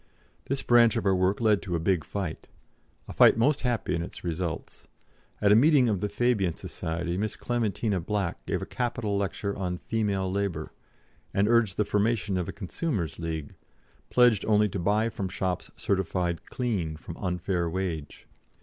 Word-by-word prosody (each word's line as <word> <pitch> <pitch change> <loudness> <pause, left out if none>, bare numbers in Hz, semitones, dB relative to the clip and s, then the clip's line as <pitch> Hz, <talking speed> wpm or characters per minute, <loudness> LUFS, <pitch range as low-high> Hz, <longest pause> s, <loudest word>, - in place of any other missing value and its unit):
This 135 0 -2
branch 120 -2 +5
of - - -1
our 95 - +4
work 95 +2 +2
led 110 -3 +3
to 90 -4 -3
a - - 0
big 85 -1 +1
fight 95 -3 -5 0.6
a - - -7
fight - - +6
most 135 +5 +3
happy 120 -6 -1
in 85 - 0
its 85 - -8
results. 85 -1 -4 0.5
At 100 - +4
a - - +8
meeting 135 +1 +5
of 100 -5 0
the 105 - -1
Fabian 105 -5 +1
Society, 85 +2 -4
Miss 110 +2 -2
Clementina 110 -4 -1
Black 95 0 -2
gave - - -1
a - - -4
capital 120 -4 -2
lecture 100 0 -2
on 90 -2 -2
Female 100 -3 -1
Labour, 95 -6 -2 0.6
and 100 +1 +3
urged 115 -5 +3
the 105 - +2
formation 105 -2 +1
of 90 -2 -2
a - - -2
Consumers' 100 - -3
League, 80 -3 -4 0.6
pledged 120 -5 +4
only 105 -1 +4
to 95 - -4
buy 105 +5 +2
from 100 -4 -4
shops 90 -1 -2
certificated 90 -3 -1
"clean" 100 -11 -2
from 85 - -9
unfair 90 -2 -1
wage. 85 -5 -4
100 Hz, 170 wpm, -27 LUFS, 90-110 Hz, 0.6 s, a